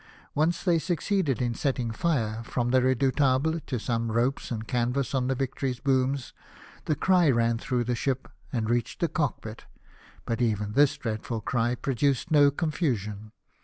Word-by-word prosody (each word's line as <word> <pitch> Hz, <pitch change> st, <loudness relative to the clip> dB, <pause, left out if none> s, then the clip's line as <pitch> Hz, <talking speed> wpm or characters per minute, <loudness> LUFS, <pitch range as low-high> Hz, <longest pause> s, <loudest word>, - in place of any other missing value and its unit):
Once 160 Hz, +3 st, +1 dB
they 175 Hz, -3 st, +3 dB
succeeded 175 Hz, -, 0 dB
in 120 Hz, -1 st, 0 dB
setting 130 Hz, -5 st, -1 dB
fire, 115 Hz, -5 st, -1 dB
from 120 Hz, +1 st, -1 dB
the 130 Hz, 0 st, +4 dB
Redoubt 130 Hz, +2 st, +2 dB, 0.2 s
able, 160 Hz, +1 st, 0 dB
to 135 Hz, -4 st, -4 dB
some 115 Hz, 0 st, -1 dB
ropes 120 Hz, +4 st, 0 dB
and 110 Hz, -2 st, -4 dB
canvas 125 Hz, +2 st, 0 dB
on 130 Hz, -2 st, +1 dB
the 135 Hz, -, 0 dB
Victory 135 Hz, +1 st, -2 dB
s 125 Hz, -1 st, -5 dB
booms. 135 Hz, -1 st, 0 dB, 0.5 s
The 155 Hz, -, +1 dB
cry 180 Hz, -3 st, +3 dB
ran 115 Hz, -2 st, +2 dB
through 125 Hz, 0 st, -1 dB
the 120 Hz, +1 st, -1 dB
ship, 130 Hz, +2 st, -2 dB, 0.2 s
and 115 Hz, -4 st, -1 dB
reached 120 Hz, +1 st, -1 dB
the 170 Hz, -, +3 dB
cockpit, 115 Hz, -8 st, -3 dB, 0.6 s
but 115 Hz, +1 st, -2 dB
even 105 Hz, -3 st, 0 dB
this 145 Hz, +2 st, +4 dB
dreadful 110 Hz, 0 st, -4 dB
cry 120 Hz, +2 st, 0 dB
produced 135 Hz, +3 st, 0 dB
no 145 Hz, -2 st, +6 dB
confusion. 120 Hz, -, -2 dB
125 Hz, 165 wpm, -27 LUFS, 115-145 Hz, 0.6 s, no